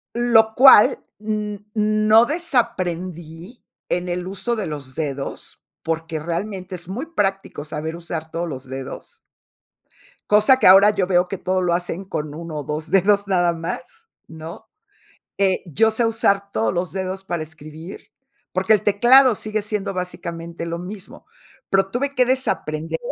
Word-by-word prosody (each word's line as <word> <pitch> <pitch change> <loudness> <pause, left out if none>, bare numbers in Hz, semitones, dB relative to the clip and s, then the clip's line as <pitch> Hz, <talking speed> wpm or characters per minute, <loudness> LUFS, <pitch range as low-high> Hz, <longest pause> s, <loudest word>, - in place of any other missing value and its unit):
Lo 225 -2 +4
cual, 255 -4 +7 0.2
n 210 -1 -4
no 215 +1 +4
desaprendí 185 - -3 0.2
en 180 0 -1
el 180 +1 -3
uso 215 +5 -2
de 210 -5 -3
los 140 -4 -7
dedos, 140 -3 -6 0.2
porque 165 -1 -3
realmente 185 +3 -4
es 175 0 -9
muy 245 +12 -5
práctico 195 - -2
saber 160 +2 -5
usar 165 -2 -6
todos 170 +1 -3
los 130 -4 -6
dedos. 135 0 -8 1.1
Cosa 215 +5 +5
que - - +4
ahora 195 +3 +8
yo 200 -3 0
veo 180 -1 +2
que 195 - -5
todo 185 +1 -1
lo 175 -1 +1
hacen 175 +2 -3
con 150 -5 -5
1 165 0 -7
ó - - -5
2 155 +2 -5
dedos 200 +2 +3
nada 175 -3 +2
más, 165 +1 -7 0.2
¿no? 165 +7 -10 0.7
Eh, 190 -2 +2
yo 220 +8 +2
sé 230 +2 0
usar 200 -3 +1
todos 110 0 0
los 175 -1 -2
dedos 190 0 -4
para 175 -3 -3
escribir, 155 +3 -11 0.4
porque 190 +4 +3
el 210 - +1
teclado 240 +5 +5
sigue 215 0 -3
siendo 205 -2 -3
básicamente 170 -2 -6
lo 170 0 -4
mismo. 190 +2 -9 0.4
Pero 195 0 +2
tuve 275 +5 -1
que 250 -1 +3
desaprender, 165 -12 -1
185 Hz, 155 wpm, -21 LUFS, 165-215 Hz, 1.1 s, ahora